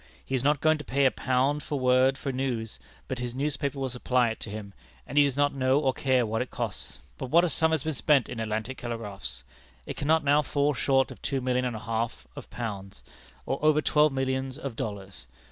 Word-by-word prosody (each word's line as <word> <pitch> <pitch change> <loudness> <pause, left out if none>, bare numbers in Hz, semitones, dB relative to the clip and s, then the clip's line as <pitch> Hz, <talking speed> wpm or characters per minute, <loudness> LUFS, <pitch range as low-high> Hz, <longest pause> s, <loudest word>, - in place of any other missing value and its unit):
He - - -6
is 130 -1 +1
not 145 0 +2
going 155 -1 +3
to - - -6
pay 140 0 +1
a 130 - +5
pound 135 +3 0
a 150 - -1
word 130 0 +3
for 140 - -3
news, 125 -4 -3 0.3
but 130 - -3
his 120 0 -4
newspapers 140 0 -1
will 135 -1 -2
supply 125 0 +1
it 110 - -5
to - - -5
him, 100 -1 -7 0.3
and - - -8
he 145 - +7
does 140 -2 0
not 145 0 +3
know 130 0 +2
or 135 -3 +1
care 130 -2 +2
what 110 +1 -1
it 125 - -3
costs. - - -5 0.2
But - - -4
what 170 +5 +5
a 180 - +2
sum 160 +1 +3
has 160 -3 0
been 155 - -1
spent 140 -2 +3
in 120 - -6
Atlantic 110 +3 -3
telegraphs! 100 - -5 0.4
It - - -6
cannot 160 +2 +2
now 145 +1 +4
fall 145 0 +1
short 135 +1 +2
of - - -11
two 135 - -1
millions 125 0 0
and 120 - -4
a - - -5
half 115 0 -3
of - - -9
pounds, 100 -5 -6 0.4
or 135 - -3
over 155 0 +5
twelve 150 0 +3
millions 130 0 -2
of 135 -5 -6
dollars. 100 -3 -6
130 Hz, 230 wpm, -27 LUFS, 115-145 Hz, 0.4 s, he